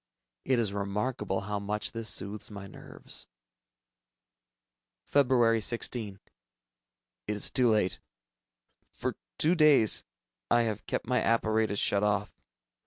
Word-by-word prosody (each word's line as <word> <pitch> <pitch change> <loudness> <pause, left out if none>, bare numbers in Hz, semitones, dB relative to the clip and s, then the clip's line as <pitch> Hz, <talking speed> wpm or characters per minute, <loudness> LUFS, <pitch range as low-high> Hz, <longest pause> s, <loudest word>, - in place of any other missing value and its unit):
It 130 - +2
is 110 -4 0
remarkable 100 0 -2
how 105 +1 -3
much 105 +1 -3
this 115 -1 -2
soothes 100 +3 -3
my 100 -2 -8
nerves. 100 - -7 1.9
Feb. 120 -5 +4
16. 110 -4 -2 1.1
It 105 - -1
is 105 - 0
too 125 -2 +3
late! 105 -5 +1 0.9
For - - -4 0.2
two 165 - +4
days, 150 - +4 0.5
I 120 - +4
have 110 -2 -3
kept - - -2
my 125 +1 +1
apparatus 110 -2 +1
shut 100 0 +2
off. 105 0 0
110 Hz, 115 wpm, -29 LUFS, 100-120 Hz, 1.9 s, Feb